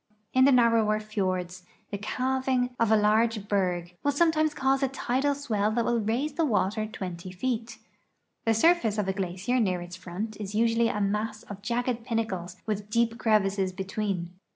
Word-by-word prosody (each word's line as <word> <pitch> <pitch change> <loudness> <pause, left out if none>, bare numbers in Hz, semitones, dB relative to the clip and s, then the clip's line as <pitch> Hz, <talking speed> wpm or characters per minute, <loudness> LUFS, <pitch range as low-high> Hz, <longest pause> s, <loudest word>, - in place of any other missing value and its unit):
In 260 0 +6
the 280 - +6
narrower 230 -4 +4
ti(»r(ls 185 -4 -2 0.3
the 200 - -2
calving 255 +2 -1
of 230 -2 +2
a - - +7
large 215 0 +2
berg 180 -3 -1
will 285 - +3
sometimes 310 0 +2
cause 270 0 +1
a 270 - +3
tidal 270 +2 0
swell 215 -7 0
that 235 0 +1
will 240 -1 +1
raise 240 +8 -1
the 330 - 0
water 215 -4 +1
20 185 -3 -6
feet. 235 +3 -3 0.7
The 225 0 +3
surface 230 -5 +3
of 205 -2 0
a 190 - +1
glacier 190 +6 -1
near 185 -6 +1
its 175 0 -8
front 190 +4 -6
is 205 0 -5
usually 230 +1 +3
a 210 - -2
mass 210 +2 -1
of 200 -1 -9
jagged 240 +2 -1
pinnacles 195 -7 -3
with 210 -1 -3
deep 230 +1 +1
crevas.ses 195 -3 +2
betwaen. 190 -2 -3
215 Hz, 175 wpm, -27 LUFS, 195-245 Hz, 0.7 s, a